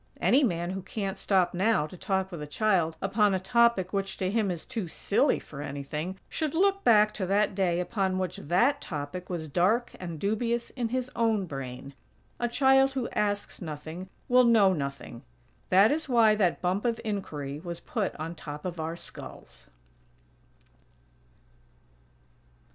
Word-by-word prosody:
Any 280 +3 +4
man 175 -6 0
who 190 0 -4
"can't 195 0 -4
stop 185 -3 +2
now" 190 -3 +2
to 155 - -10
talk 190 +1 -1
with 170 -4 -6
a 150 - -5
child 170 -2 +1
upon 200 0 +3
a - - 0
topic 235 -2 +2
which, 195 -1 -2
to 185 0 -1
him 215 -2 +1
is 175 -3 -4
"too 215 -6 -4
silly 205 - +1
for 140 -1 -9
anything," 150 +6 -5
should 310 -1 -3
look 395 +3 +2
back 215 -2 +5
to 190 -3 -3
that 200 +2 +2
day 180 -3 +1
upon 190 0 -1
which 185 -1 -2
that 185 - +2
topic 150 +3 -6
was 170 -3 -4
dark 195 - +1
and 170 -4 -6
dubious 230 +4 -1
in 240 -3 -3
his 255 +1 -2
own 225 -4 +1
brain. 135 -2 -7 0.5
A 240 - +1
child 270 +1 +4
who 260 -3 -2
asks 205 -1 -2
nothing 160 +3 -7 0.2
will 250 0 +6
know 220 -5 +5
nothing. 140 -6 -5 0.5
That 195 +4 +6
is 305 0 -2
why 230 -3 +5
that 190 -5 +1
"bump 185 +3 0
of 235 -2 0
inquiry" 150 -9 -4
was 170 0 -6
put 210 -4 -3
on 160 +2 -5
top 150 -1 -8
of 175 -2 -4
our 160 +1 -3
skulls. - - -10
190 Hz, 165 wpm, -28 LUFS, 170-225 Hz, 0.5 s, will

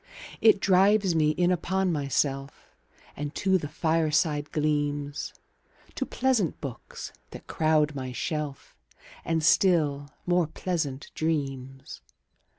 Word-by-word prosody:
It 220 -2 +6
drives 195 0 +4
me 155 -2 +3
in 175 +4 +2
upon 190 +1 0
myself 140 -2 -2 0.4
5 - - -25
And 145 +1 -5
to 190 -1 +2
the 150 - -5
fireside 155 -1 0
gleams, 145 -1 -1 0.6
To - - -3
pleasant 245 -9 0
books 135 -6 -8 0.2
that - - -11
crowd 155 -1 +2
my 130 -2 -5
shelf, 150 +1 -4 0.5
And 165 -1 0
still 150 -5 +3 0.2
more 175 -2 +2
pleasant 155 -5 -3
dreams. 135 -4 -3
155 Hz, 115 wpm, -27 LUFS, 145-175 Hz, 0.6 s, It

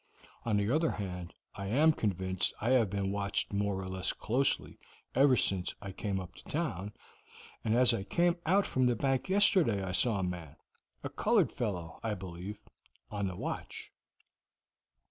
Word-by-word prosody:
On 110 -3 +2
the 100 0 +1
other 160 +1 +3
hand, 90 -3 -5 0.2
I 100 - -6
am 150 +9 +4
convinced 95 - -1
I 115 - 0
have 120 -6 +4
been 100 0 -1
watched 100 0 -1
more 100 -1 0
or 95 - -5
less 95 0 0
closely 130 +5 0 0.3
ever 135 -1 +5
since 95 -3 0
I 100 -1 -7
came 95 0 -2
up 90 0 -8
to - - -13
town, 105 - -3 0.7
and 110 0 +1
as 125 0 +6
I 115 - -1
came 170 - +2
out 195 +4 +4
from 130 -1 +2
the 120 - +2
bank 135 - 0
yesterday 185 - +4
I 95 - -3
saw 110 +3 +2
a 95 - -1
man 85 -5 -5 0.5
a - - -3
colored - - +2
fellow, 90 -8 -4
I 110 -2 -1
believe 95 +2 -7 0.5
on 100 -2 -1
the 95 - -4
watch. - - -5
100 Hz, 170 wpm, -32 LUFS, 95-125 Hz, 0.7 s, as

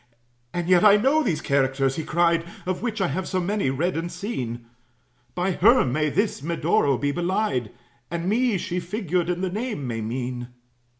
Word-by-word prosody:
"And 175 -1 -3
yet 180 -1 +5
I 210 -1 +8
know 270 +8 +3
these 185 - -1
characters," 135 -1 +1
he 160 - -3
cried, 170 +1 +2 0.2
"Of 185 0 -2
which 225 -3 -2
I 190 - +2
have 180 +7 -3
so 185 - -1
many 195 -3 0
read 160 +8 -1
and 165 +2 -3
seen; 130 - -4 0.7
By 180 +2 0
her 230 +8 +5
may 150 +4 0
this 200 0 0
Medoro 145 -3 +1
be 145 +2 0
belied, 175 - -1 0.4
And 170 +1 -3
me, 230 +1 +2
she, 180 0 -3
figured 180 -2 -2
in 180 0 -1
the 190 -1 -1
name, 215 - -3
may 115 -2 -3
mean." 120 +2 -4
175 Hz, 180 wpm, -24 LUFS, 140-200 Hz, 0.7 s, I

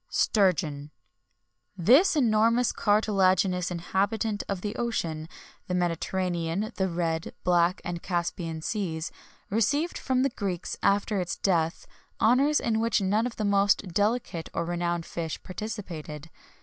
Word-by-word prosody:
[XXI - - -46
30] - - -4
STURGEON. 155 -8 +1 0.9
This 260 - +5
enormous 230 -2 +3
cartilaginous 190 -3 +2
inhabitant 200 +5 -1
of 195 -3 -2
the 210 +2 -4
ocean, 165 -10 -2 0.4
the 180 - -1
Mediterranean, 175 +2 -1
the 190 -2 +1
Red, 165 -1 -2
Black, 175 0 +2
and 175 -1 -4
Caspian 170 -2 -3
Seas, 165 -7 -2 0.4
received 285 - +1
from 260 -1 +1
the 275 - +1
Greeks, 190 -5 -3
after 200 0 +2
its 175 - -3
death, 165 -4 0 0.3
honours 275 +6 +4
in 225 -2 0
which 230 0 +2
none 205 +4 +1
of 245 - -8
the 215 - -2
most 200 -1 +2
delicate 205 -2 -1
or 170 - -1
renowned 175 -1 -2
fish 165 -2 -4
participated. 170 -7 -7
190 Hz, 135 wpm, -27 LUFS, 170-220 Hz, 0.9 s, This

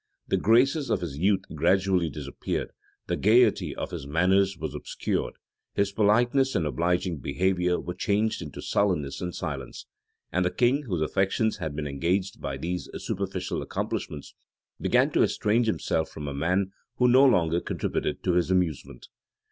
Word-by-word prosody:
The - - +1
graces 135 +7 +3
of 95 - +1
his 75 -5 -5
youth 95 +2 +2
gradually 90 +2 +2
disappeared, 70 -1 -4 0.3
the - - -1
gayety 110 +2 +3
of - - -5
his 70 - -6
manners 95 +5 +2
was - - -4
obscured, - - -3 0.4
his 100 0 +1
politeness 120 +6 +2
and 80 - +1
obliging 85 +3 0
behavior 90 +5 0
were 90 - -5
changed 105 +4 0
into 75 -4 -8
sullenness 75 -9 0
and 90 -1 -4
silence. - - -5 0.5
And 90 - +1
the 90 - +2
king, 130 +8 +1
whose 90 -6 -1
affections 100 +6 0
had 80 -6 -4
been 75 0 -3
engaged 85 +7 -1
by 70 -1 -3
these 90 +5 -4
superficial 95 -1 -3
accomplishments, 75 -2 -4 0.5
began - - +2
to - - +2
estrange 115 +3 +2
himself 80 -6 0
from 75 -2 -7
a 70 - -3
man 90 +7 0 0.2
who 125 +1 +3
no 130 +2 +6
longer 85 - +4
contributed - - -2
to 90 - +1
his 90 0 +2
amusement. 85 -9 -1
90 Hz, 155 wpm, -27 LUFS, 80-105 Hz, 0.5 s, no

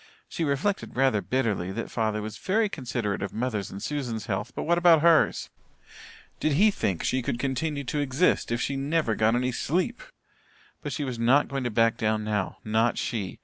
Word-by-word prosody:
She 165 - -3
reflected 155 +7 -1
rather 130 -5 +2
bitterly 105 -9 -1
that 115 - -5
father 110 -2 -1
was 105 0 -7
very 215 +3 +1
considerate 120 - -3
of 100 - -4
mother's 110 -4 -2
and 95 - -8
Susan's 125 -8 -3
health, 95 0 -3
but - - -3
what 170 +1 +2
about 170 -3 +6
hers? 170 -2 +3 0.9
Did 155 - +1
he 205 +9 +5
think 95 - -2
she 130 - 0
could 120 - -2
continue 140 +3 -2
to 145 +3 -2
exist 145 0 +1
if 120 - 0
she 140 - -1
never 140 -2 0
got 110 +2 +2
any 125 +1 0
sleep? 180 - -1 0.8
But - - -5
she 150 - -3
was 125 -4 -4
not 125 +5 +4
going 135 -2 -3
to - - +1
back 115 +1 +2
down 110 0 0
now 105 -3 -2
not 110 +2 +1
she. 105 -6 -3
125 Hz, 190 wpm, -26 LUFS, 110-145 Hz, 0.9 s, about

